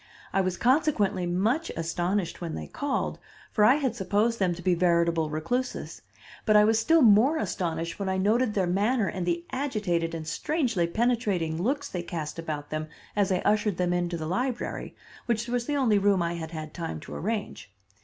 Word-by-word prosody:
I 195 - +3
was 185 -1 -1
consequently 240 - +2
much 220 - 0
astonished 175 +3 -1
when 165 -2 -4
they - - -5
called, 285 -2 -2 0.3
for 210 - +2
I 250 +5 +7
had 265 -6 -1
supposed 215 +3 +1
them 180 -3 +1
to 175 - -9
be 185 - +3
veritable 170 -2 +2
recluses, 245 +13 -3 0.4
but 215 - +3
I 210 - +8
was 220 +1 +3
still 325 +6 +4
more 235 +8 +6
astonished 170 - -3
when 195 -1 -1
I 190 - 0
noted 215 +4 +2
their 190 -2 +2
manner 205 +5 +1
and 180 -2 -3
the 170 0 -1
agitated 200 - -1
and 160 -1 -6
strangely 230 - 0
penetrating 195 -6 0
looks 280 +7 0
they 180 - -4
cast 165 -2 -5
about 150 -3 -5
them 155 0 -3 0.3
as 200 -2 +2
I 185 - +1
ushered 210 -3 +2
them 180 -1 +1
into 175 -1 -1
the 160 - -4
library, 240 +9 -3 0.3
which 235 0 0
was 240 0 -1
the 295 - 0
only 235 -7 +3
room 195 -3 +3
I 170 0 -1
had 165 -2 -5
had 155 -2 -7
time 165 -2 -4
to - - -9
arrange. 205 - -4
195 Hz, 190 wpm, -27 LUFS, 170-235 Hz, 0.4 s, I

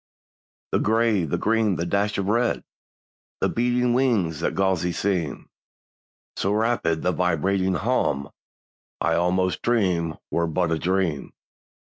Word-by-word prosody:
The - - +2
gray, 110 -4 +2
the 75 - -1
green, 110 -3 +1
the 85 - -2
dash 100 +3 0
of 100 - -1
red, 115 +4 +1 0.8
The - - +1
beating 120 +1 +1
wings 110 - +1
that 85 - -1
gauzy 95 -2 +1
seem— 90 -8 -2 0.9
So 95 - 0
rapid 110 -7 0
the 90 - +2
vibrating 90 +2 +1
hum— 75 - 0 0.7
I - - +1
almost 90 -1 +1
dream 90 -9 +1 0.2
were 85 0 +1
but 85 +1 0
a 80 - 0
dream. 90 -5 -1
95 Hz, 130 wpm, -24 LUFS, 85-110 Hz, 0.9 s, The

